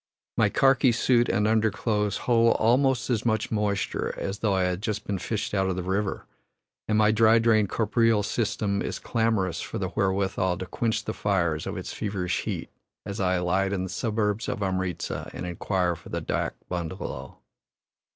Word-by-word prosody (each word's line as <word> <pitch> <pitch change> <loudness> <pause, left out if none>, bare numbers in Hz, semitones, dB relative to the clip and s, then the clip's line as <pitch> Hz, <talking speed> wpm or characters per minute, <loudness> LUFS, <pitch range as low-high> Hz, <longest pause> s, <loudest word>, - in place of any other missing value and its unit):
My - - +3
karki 135 -1 +4
suit 120 +1 +3
and 105 0 +2
underclothes 105 -2 +1
hold 115 -1 +4
almost 125 +2 +2
as 115 -4 +1
much 110 -2 0
moisture 105 -2 -1
as 100 +1 -4
though 105 -3 +1
I 95 - +2
had 90 +1 -1
just 110 -1 -3
been 100 -2 -2
fished 105 +3 -3
out 95 -2 +1
of 95 - -1
the 90 - -3
river, 100 +3 -2 0.6
and 110 - +2
my 110 0 +5
dry 110 +1 +5
drained 110 -3 +3
corporeal 115 -1 +2
system 105 -2 -1
is - - -3
clamorous 110 -6 0
for - - -5
the - - -2
wherewithal 95 -1 0
to 95 - -5
quench 110 +3 -1
the 110 - -2
fires 85 -6 0
of - - -4
its - - -5
feverish 100 -4 -2
heat - - -4 0.3
as 100 - -5
I 95 -1 +2
alight 95 +2 +1
in 95 -2 -1
the 95 - -4
suburbs 105 +2 -1
of 105 - -2
Amritza 95 -2 -2
and - - -5
inquire 90 0 -1
for - - -13
the - - -2
dak - - -2
bungalow. 90 0 -5
105 Hz, 180 wpm, -26 LUFS, 95-110 Hz, 0.6 s, my